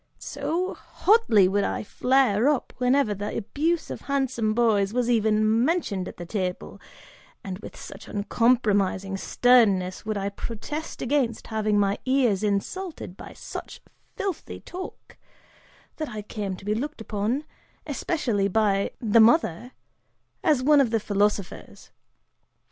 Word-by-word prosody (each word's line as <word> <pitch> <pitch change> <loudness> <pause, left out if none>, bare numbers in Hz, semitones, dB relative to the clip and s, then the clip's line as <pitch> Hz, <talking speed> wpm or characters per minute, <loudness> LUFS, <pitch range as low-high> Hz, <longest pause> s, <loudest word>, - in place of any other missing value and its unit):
So 360 +3 -3
hotly 365 - +3
would 200 +2 +1
I - - -2
flare 250 +1 +2
up, 295 -4 -1
whenever 250 -3 +2
the 205 +1 -4
abuse 315 +10 -1
of - - -6
handsome 260 -6 -1
boys 215 -4 +2
was 245 -1 +1
even 220 0 +3
mentioned 250 - 0
at - - -9
the 175 - -7
table, 185 -1 -4 0.6
and 190 -1 -6
with - - -10
such - - -10
uncompromising 205 -3 +1
sternness 200 -6 +3
would 215 -1 -2
I 200 0 -2
protest 235 +9 -6
against 255 -4 0
having 215 -1 +1
my 200 0 +1
ears 255 -7 +2
insulted 215 - -3
by - - -10
such - - -8 0.4
filthy 390 -5 -4
talk, 370 +1 -9 0.8
that 310 -2 -3
I 215 -3 -6
came 200 -2 -4
to 185 - -13
be 210 - +1
looked 290 +7 -4
upon, 220 +6 -2 0.4
especially 235 - -1
by 200 -1 +1
the 225 -1 +4
mother, 240 - +3 0.7
as 285 -5 +3
one 290 +1 +6
of 255 - +2
the 225 0 +1
philosophers. 205 -2 -2
220 Hz, 135 wpm, -25 LUFS, 200-265 Hz, 0.8 s, one